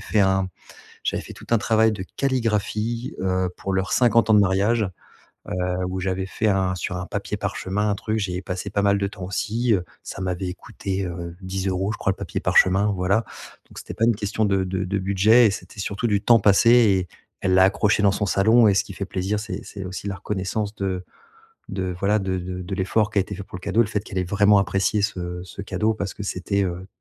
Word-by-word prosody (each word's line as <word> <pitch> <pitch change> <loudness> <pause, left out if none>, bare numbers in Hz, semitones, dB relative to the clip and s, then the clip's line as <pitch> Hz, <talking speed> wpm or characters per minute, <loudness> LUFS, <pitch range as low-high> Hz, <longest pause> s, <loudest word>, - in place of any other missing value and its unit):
fait 110 - 0
un 95 -1 +2 0.5
j'avais - - -1
fait - - -10
tout - - -13
un 115 - +4
travail 110 +1 +3
de 95 -3 -5
calligraphie, 115 -2 -1
heu, 95 -1 0
pour 95 - -4
leurs 95 +1 -1
50 115 -3 +4
ans - - +7
de - - +7
mariage, 100 +3 +2 0.6
heu, - - -3 0.3
où 95 0 -3
j'avais 95 0 -2
fait 110 +3 -1
un 95 -2 +1
sur 90 +1 -4
un 90 - -4
papier - - -4
parchemin 105 +3 -2
un - - +1
truc. 110 +2 -2
J'y 90 -3 -2
ai 95 - -4
passé 90 +2 -4
pas 100 +1 0
mal 100 0 +3
de 100 - 0
temps 95 -2 -8
aussi, 110 +5 0
heu, 90 - -1 0.2
ça - - -7
m'avait 90 0 -2
couté, 95 +1 -4
heu, 85 -1 -6
10 95 +1 -3
euros 95 +3 -1
je - - -7
crois 95 - +1
le - - -9
papier - - -4
parchemin 95 +3 +4
voilà 95 +4 +1 0.4
donc - - -18
c'était - - -8
pas 115 - +1
une 120 - +3
question 105 +1 -1
de 95 -1 +1
de 95 0 -2
de 95 +2 -1
budget 100 +5 +5
et - - +1
c'était 100 0 -7
surtout 100 +4 -2
du 100 -2 +1
temps 115 +2 +6
passé 100 +3 +5
et 100 -7 +4 0.3
elle 95 - +1
l'a 95 - +7
accroché 105 +2 +2
dans 100 - +5
son 100 - -1
salon 110 +4 +5
et 100 - +3
ce - - +2
qui 100 - -9
fait 100 - -4
plaisir 95 +2 -2
c'est 105 +1 -5
c'est 100 -2 -8
aussi 95 +2 -6
la 100 - -3
reconnaissance 100 +3 -3
de 95 -2 -3 0.6
de 95 -2 -3
voilà, 105 +2 +2
de 95 -1 -2
de 90 0 -5
de 95 +2 -5
l'effort 105 +3 +1
qui 105 - 0
a - - +6
été 100 +1 -4
fait 100 - -6
pour 90 - -9
le - - -17
cadeau, 105 +3 +3
le 110 - -2
fait 105 -2 -1
qu'elle 100 - -9
ait 90 - 0
vraiment 100 +3 +4
apprécié 100 +2 +1
ce 90 -3 -3
ce 95 +2 -9
cadeau 105 +3 0
parce 100 -2 -4
que 100 - -7
c'était, 100 +1 -1
heu, 90 +1 -4
100 Hz, 240 wpm, -23 LUFS, 95-105 Hz, 0.6 s, ans